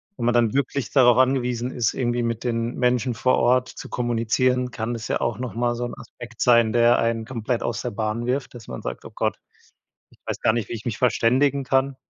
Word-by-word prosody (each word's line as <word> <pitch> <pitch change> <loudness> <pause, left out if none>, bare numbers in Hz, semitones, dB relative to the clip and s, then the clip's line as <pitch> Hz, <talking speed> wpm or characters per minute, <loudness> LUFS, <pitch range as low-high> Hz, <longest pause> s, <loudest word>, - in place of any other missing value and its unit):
wo - - -6
man 120 0 +2
dann 115 -3 +3
wirklich 140 -4 -1
darauf 125 -3 +5
angewiesen 125 -1 +1
ist, 115 -3 -1
irgendwie 120 -1 0
mit 115 0 -2
den 115 0 -2
Menschen 125 -1 +1
vor 130 +3 +2
Ort 125 +1 +2
zu - - -10
kommunizieren, 125 +1 0
kann 120 0 -4
das 115 -2 -5
ja - - -1
auch 115 0 -2
noch 125 -3 -5
mal 120 0 +1
so 120 +1 -3
'n 120 - -6
Aspekt 120 -1 -11
sein, 115 -2 +4
der 120 0 +4
einen 115 -1 0
komplett 120 -1 -3
aus 115 -3 -2
der - - -3
Bahn 110 +3 -3
wirft, 130 0 -2
dass 120 -3 -11
man - - -7
sagt: - - -5
„Oh - - -10
Gott, - - -1 0.7
ich - - -24
weiß - - -4
gar 110 - +3
nicht, 115 -3 -2
wie - - -5
ich 110 - -7
mich 115 -4 -3
verständigen 130 +3 +2
kann.“ 135 +1 +1
120 Hz, 230 wpm, -23 LUFS, 115-125 Hz, 0.7 s, darauf